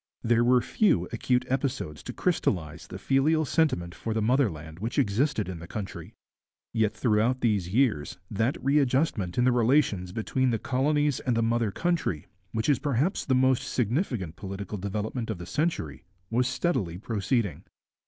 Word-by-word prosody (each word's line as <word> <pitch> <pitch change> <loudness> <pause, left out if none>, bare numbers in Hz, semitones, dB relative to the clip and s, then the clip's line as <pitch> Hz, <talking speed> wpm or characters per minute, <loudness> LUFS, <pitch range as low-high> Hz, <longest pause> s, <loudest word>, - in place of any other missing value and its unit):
There 120 0 +3
were 125 +1 +4
few 95 - +2
acute 125 -1 +1
episodes 130 - -2
to - - -6
crystallize 80 -5 -1
the - - -7
filial 155 +4 +2
sentiment 130 - +1
for 110 +4 -4
the 110 - +1
motherland 90 - 0
which 115 +4 -4
existed 120 -2 +1
in 90 -3 -5
the 85 - -9
country. 100 0 -7 0.6
Yet 110 -2 +1
throughout 115 +3 +1
these 100 -6 +1
years 110 - +1
that 110 +6 0
readjustment 135 - +1
in 125 - +3
the 125 - +4
relations 120 -7 +2
between 130 +5 0
the 115 - +1
colonies 145 +3 +1
and 120 -2 0
the 115 - +2
mother 115 -1 +1
country, 165 - -1 0.3
which 110 0 -1
is 145 -4 +3
perhaps 145 - 0
the 130 - +2
most 130 0 +3
significant 115 - -1
political 100 +1 -6
development 105 +4 -3
of 110 - -2
the 85 - -8
century, 145 - -2 0.3
was 125 +2 +2
steadily 130 - -1
proceeding. 105 0 -1
115 Hz, 160 wpm, -27 LUFS, 100-130 Hz, 0.6 s, were